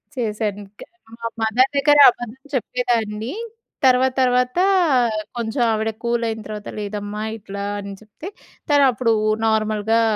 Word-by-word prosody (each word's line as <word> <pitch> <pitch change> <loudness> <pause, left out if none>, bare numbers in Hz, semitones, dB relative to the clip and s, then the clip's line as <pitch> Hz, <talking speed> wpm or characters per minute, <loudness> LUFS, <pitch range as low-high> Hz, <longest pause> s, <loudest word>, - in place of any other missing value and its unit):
చేశాను 210 -3 -2 0.2
క్ - - -8 0.3
మా 230 - -4
మదర్ 235 +4 +3
దగ్గర 290 +1 +4
అబద్ధం 240 +1 -7 0.2
చెప్పేదాన్ని. 230 -1 -2 0.5
తర్వాత 260 0 +4
తర్వాత 250 +4 +2 0.8
కొంచెం 235 +2 -2
ఆవిడ 220 0 0
కూలయిన 230 -2 -1
తర్వాత, 210 -1 -7
లేదమ్మా 205 +1 -5
ఇట్లా 200 -1 -7 0.2
అని 200 0 -7
చెప్తే 220 - -10 0.4
తనప్పుడు 255 -5 +3 0.3
నార్మల్‌గా 220 +1 +1
225 Hz, 110 wpm, -21 LUFS, 215-250 Hz, 0.8 s, దగ్గర